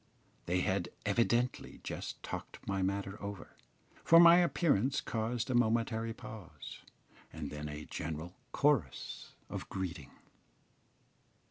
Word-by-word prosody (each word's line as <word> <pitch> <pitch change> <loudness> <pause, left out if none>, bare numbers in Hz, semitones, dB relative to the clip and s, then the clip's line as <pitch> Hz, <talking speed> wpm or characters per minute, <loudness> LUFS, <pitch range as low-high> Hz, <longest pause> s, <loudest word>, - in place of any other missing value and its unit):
They 90 +1 +2
had 95 -1 0 0.2
evidently 120 +4 +1
just - - -5
talked - - -7
my 95 -1 0
matter 100 +1 -2
over, 100 -1 -7 0.5
for 165 - +8
my 170 0 +10
appearance 140 - +3
caused 115 +2 -2
a - - +1
momentary 115 -1 +2
pause, 110 - -9 0.5
and 75 -3 -5
then 75 0 -5
a 75 +1 -6
general 80 +2 -5 0.2
chorus 135 - 0
of - - -6
greeting. 90 -6 -4
100 Hz, 115 wpm, -34 LUFS, 90-120 Hz, 0.5 s, my